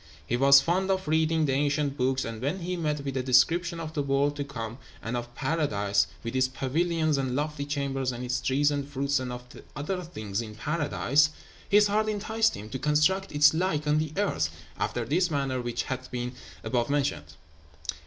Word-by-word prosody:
He 120 Hz, -, 0 dB
was 140 Hz, +2 st, +7 dB
fond 185 Hz, +4 st, 0 dB
of 190 Hz, -3 st, 0 dB
reading 160 Hz, 0 st, +2 dB
the 140 Hz, -, +1 dB
ancient 145 Hz, 0 st, +1 dB
books; 130 Hz, 0 st, 0 dB
and 115 Hz, -1 st, -6 dB
when 145 Hz, +8 st, -2 dB
he 180 Hz, +2 st, -2 dB
met 150 Hz, -4 st, -1 dB
with 135 Hz, -, -2 dB
the 130 Hz, -, -1 dB
description 165 Hz, +7 st, +3 dB
of 160 Hz, -1 st, -6 dB
the 150 Hz, -, 0 dB
world 140 Hz, +1 st, +1 dB
to 145 Hz, -, -1 dB
come, 115 Hz, -3 st, -6 dB, 0.2 s
and 115 Hz, +2 st, -4 dB
of 120 Hz, 0 st, -5 dB
paradise, 105 Hz, -10 st, +1 dB, 0.2 s
with 115 Hz, +2 st, -4 dB
its 130 Hz, 0 st, +3 dB
pavilions 155 Hz, +3 st, 0 dB
and 130 Hz, -2 st, -1 dB
lofty 150 Hz, 0 st, -2 dB
chambers, 135 Hz, -2 st, -1 dB
and 120 Hz, 0 st, -6 dB
its 125 Hz, 0 st, -1 dB
trees 145 Hz, +2 st, +2 dB
and 140 Hz, -1 st, -2 dB
fruits, 140 Hz, 0 st, 0 dB
and 130 Hz, -1 st, -4 dB
of 125 Hz, 0 st, -7 dB
the -, -, -13 dB
other 180 Hz, +6 st, -3 dB
things 110 Hz, -, -4 dB
in 110 Hz, -2 st, -8 dB
paradise, 150 Hz, +2 st, +2 dB, 0.4 s
his 205 Hz, +1 st, +6 dB
heart 215 Hz, +1 st, +1 dB
enticed 220 Hz, +2 st, +1 dB
him 105 Hz, -, -8 dB
to 130 Hz, -, -4 dB
construct 155 Hz, +7 st, +2 dB
its 145 Hz, 0 st, +6 dB
like 160 Hz, -3 st, 0 dB
on 150 Hz, +1 st, +3 dB
the 155 Hz, -1 st, -2 dB
earth, 200 Hz, -, +1 dB, 0.3 s
after 120 Hz, -1 st, -1 dB
this 170 Hz, +8 st, +2 dB
manner 135 Hz, -4 st, -1 dB
which 120 Hz, -1 st, -2 dB
hath 130 Hz, -1 st, -5 dB
been 125 Hz, 0 st, -3 dB, 0.3 s
above 120 Hz, -1 st, 0 dB
mentioned. 135 Hz, -, -1 dB
140 Hz, 200 wpm, -28 LUFS, 125-160 Hz, 0.4 s, was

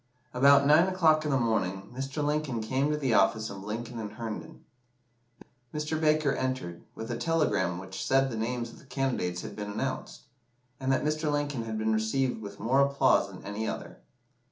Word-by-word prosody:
About 140 Hz, +2 st, +6 dB
nine 155 Hz, +5 st, +6 dB
o'clock 160 Hz, -4 st, +3 dB
in -, -, 0 dB
the 135 Hz, -, +3 dB
morning, 100 Hz, -5 st, -1 dB
Mr. 135 Hz, +3 st, -3 dB
Lincoln 150 Hz, -5 st, 0 dB
came 130 Hz, +6 st, 0 dB
to 150 Hz, -, +1 dB
the 135 Hz, -5 st, 0 dB
office 110 Hz, +1 st, +3 dB
of 100 Hz, -1 st, -8 dB
Lincoln 115 Hz, +3 st, -5 dB
and 105 Hz, -1 st, -5 dB
Herndon. 110 Hz, -1 st, -7 dB, 1.1 s
Mr. 150 Hz, +1 st, -2 dB
Baker 155 Hz, -2 st, +3 dB
entered, 130 Hz, -11 st, -3 dB
with 115 Hz, +2 st, -5 dB
a 120 Hz, -, -2 dB
telegram 155 Hz, -, +1 dB
which 95 Hz, +1 st, -6 dB
said 135 Hz, 0 st, +3 dB
the -, -, -3 dB
names 120 Hz, +1 st, -2 dB
of -, -, -14 dB
the 160 Hz, -, -18 dB
candidates 125 Hz, -10 st, -1 dB
had -, -, -7 dB
been 105 Hz, -1 st, -5 dB
announced, 100 Hz, -, -4 dB, 0.6 s
and 135 Hz, 0 st, 0 dB
that 135 Hz, -, +2 dB
Mr. 150 Hz, 0 st, 0 dB
Lincoln's 145 Hz, -5 st, -1 dB
had 110 Hz, -1 st, -3 dB
been 110 Hz, 0 st, +1 dB
received 110 Hz, +3 st, 0 dB
with 100 Hz, -1 st, -8 dB
more 130 Hz, +6 st, +3 dB
applause 140 Hz, 0 st, +3 dB
than -, -, -11 dB
any 105 Hz, +2 st, -3 dB
other. -, -, -6 dB
125 Hz, 185 wpm, -29 LUFS, 110-145 Hz, 1.1 s, About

